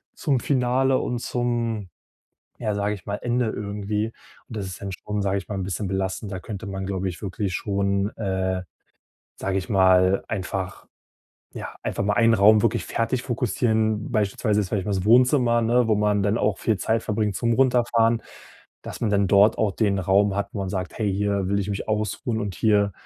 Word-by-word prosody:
zum 140 -6 0
Finale 130 0 +2
und 120 - -2
zum, 120 -5 -2 0.7
ja, 110 -3 -1
sage 105 +1 0
ich 100 - -11
mal, 100 0 -2
Ende 120 +1 0
irgendwie. 105 +1 -3 0.4
Und 110 - -8
das 100 - -3
ist 90 - -8
dann 100 - -5
schon, 105 +3 -4
sage 100 0 0
ich 95 - -8
mal, 100 - -3
'n 95 - -2
bisschen 95 +2 -3
belastend. 95 +2 -3
Da 95 - -4
könnte 105 +2 -7
man 95 -1 -4
glaube 95 -1 -2
ich 85 - -10
wirklich 95 -1 -3
schon, 100 0 0
äh, 95 -3 -1 0.7
sage 95 0 -1
ich 95 - -5
mal, 95 -1 +4
einfach, 95 0 -4 0.7
ja - - -6
einfach - - -2
mal 105 - +1
einen 115 +2 +4
Raum 105 0 +6
wirklich 115 0 0
fertig 115 +2 -1
fokussieren, 110 -3 0
beispielsweise 105 0 +1
ist 95 - -3
vielleicht 100 -3 -1
mal 105 - -1
das 95 0 -2
Wohnzimmer, 120 +1 +4
ne, 120 +1 +2
wo 110 - +2
man 105 -1 +2
dann 105 +3 +1
auch 105 -3 +1
viel 110 -4 0
Zeit 110 0 0
verbringt 105 -2 -1
zum 115 -1 +1
Runterfahren, 120 -2 +3 0.6
dass - - -8
man 110 - +1
dann 100 -1 +2
dort 100 +2 +5
auch 105 -3 +1
den 100 -2 +1
Raum 95 +2 +2
hat, 100 -1 -1
wo 100 - -4
man 95 - -3
sagt: 95 -2 -4
"Hey, 105 -3 0
hier 100 -1 0
will 100 - +1
ich 100 - -4
mich 100 +1 -4
ausruhen 110 +2 -1
und 100 -4 -3
hier 100 -3 +2
105 Hz, 200 wpm, -24 LUFS, 100-115 Hz, 0.7 s, Raum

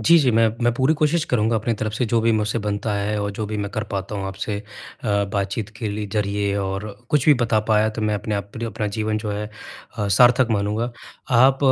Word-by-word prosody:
जी, 170 +10 +6
जी, 130 -5 +3
मैं 115 0 +4 0.2
मैं 120 - +4
पूरी 130 +5 +2
कोशिश 155 +1 +1
करूँगा 115 -1 +2
अपनी 110 +2 0
तरफ़ 110 0 -1
से 125 - 0
जो 115 - +4
भी 115 +1 +2
मुझसे 110 +1 0
बनता 105 0 -2
है 105 +1 -1
और 100 - -2
जो 105 +2 -4
भी 105 +1 -4
मैं 100 -1 -3
कर 110 +1 -3
पाता 100 +1 -3
हूँ 100 -1 -3
आपसे 95 +2 -4 0.5
अ, 100 -2 +2
बातचीत 100 +1 -2
के 110 -1 -3
लि 105 +1 -3
ज़रिए 100 -1 0
और 95 +1 -2 0.3
कुछ 145 -3 +2
भी 150 - +8
बता 110 -2 +2
पाया 110 0 +4
तो 110 0 -4
मैं 105 0 +1
अपने 105 +1 -2
आप 100 0 -4
पर 115 - -4
अपना 110 -2 -3
जीवन 110 0 0
जो 105 0 -4
है 105 +1 -3 0.5
अ, 105 -1 0
सार्थक 120 +5 +5
मानूँगा। 105 +3 0 0.4
आप 130 +3 +5
110 Hz, 235 wpm, -22 LUFS, 100-115 Hz, 0.5 s, भी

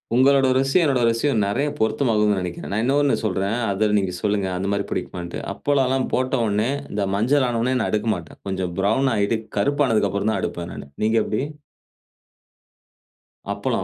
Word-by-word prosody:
உங்களோட 135 +1 +5
ருசியும், 135 +7 +3
என்னோட 135 -5 +2
ருசியும் 115 0 +1
நெறைய 140 +9 0
பொருத்தமாவுதுனு 110 -2 +2
நெனக்கிறேன். 90 -1 -5
நான் 105 - +1
இன்னொன்னு 140 +2 +2
சொல்றேன், 100 0 0 0.2
அத 105 +2 +1
நீங்க 95 -2 0
சொல்லுங்க, 100 -2 0
அந்த 95 +2 -2
மாரி 100 0 0
பிடிக்குமான்ட்டு. 85 -1 -4
அப்பளம்லாம் 135 -2 +1
போட்டவொன்னே 120 -4 +1 0.2
இந்த 100 -1 -1
மஞ்சள் 130 +7 +2
ஆனவொன்னே 120 +2 0
நான் 110 - -1
எடுக்கமாட்டேன். 105 -6 -2
கொஞ்சம் 95 -2 -2
ப்ரவுன் 110 +7 +2
ஆகிட்டு 105 +2 +1 0.2
கருப்பானதுக்கு 115 -3 +2
அப்புறம் 100 +2 0
தான் - - -1
எடுப்பேன் 85 0 -4
நானு. - - -8 0.2
நீங்க 110 +1 +2
எப்படி? 105 - -2 2.1
அப்பளம், - - -2
110 Hz, 150 wpm, -22 LUFS, 100-130 Hz, 2.1 s, உங்களோட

